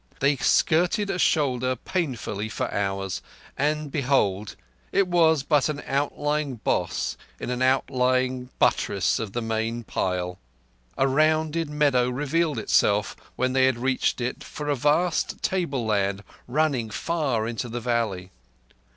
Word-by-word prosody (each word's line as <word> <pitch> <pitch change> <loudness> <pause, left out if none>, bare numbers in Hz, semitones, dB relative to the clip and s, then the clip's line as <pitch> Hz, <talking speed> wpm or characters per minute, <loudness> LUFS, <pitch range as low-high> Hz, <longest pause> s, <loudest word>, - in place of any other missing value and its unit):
They 140 +1 +3
skirted 180 - +2
a 180 - -3
shoulder 130 -6 +2
painfully 125 - -3
for - - -3
hours, 95 -1 -2 0.3
and, 150 +1 -1
behold, 115 -8 +1 0.4
it 195 -2 +3
was 160 -5 +3
but 145 -1 +2
an 145 -1 -4
outlying 145 0 -1
boss 110 - -1 0.2
in 125 - -4
an 125 0 -2
outlying 130 -1 +1
buttress - - +2
of 110 -3 -5
the 120 - -2
main 115 +1 -2
pile! 90 -3 -2 0.6
A 135 - +3
rounded 155 +3 +2
meadow 140 -5 +2
revealed 150 +3 0
itself, 105 -1 +2 0.2
when 130 0 0
they 130 0 +4
had 130 -2 +1
reached 130 +1 0
it, 125 +1 -3
for 150 -1 -6
a 145 - +2
vast 150 +6 +1
tableland 110 - 0 0.2
running 135 -4 0
far 135 -4 -1
into 120 +1 -4
the 120 +2 -3
valley. 110 -6 -1
130 Hz, 135 wpm, -25 LUFS, 115-150 Hz, 0.6 s, they